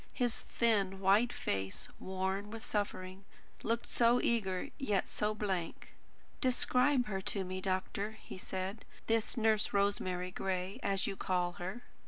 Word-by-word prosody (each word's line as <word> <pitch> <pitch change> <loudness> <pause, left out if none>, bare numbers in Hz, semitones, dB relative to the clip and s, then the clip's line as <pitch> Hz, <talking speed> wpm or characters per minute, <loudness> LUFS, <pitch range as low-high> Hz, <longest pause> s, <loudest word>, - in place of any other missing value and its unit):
His 245 -2 0
thin 200 -5 +1
white 200 +5 +5
face, 95 0 -2
worn 190 +2 -2
with 225 +1 -7
suffering, 195 -2 -2 0.4
looked 230 +1 0
so 240 +1 +4
eager 195 -7 +1
and 285 - -7
yet 210 -8 +1
so 210 0 0
blank. 190 -6 -3 0.5
"Describe 255 +1 +3
her 195 -3 -2
to 195 0 0
me, 185 0 -4
doctor," 195 +3 -1
he - - -9
said; 190 +4 -4 0.2
"this 225 +2 +1
Nurse 220 -2 +3
Rosemary 185 -3 +1
Gray, 185 +1 -2
as 195 -1 +1
you 200 - -2
call 180 -2 0
her." 190 +7 -4
200 Hz, 145 wpm, -34 LUFS, 185-225 Hz, 0.5 s, white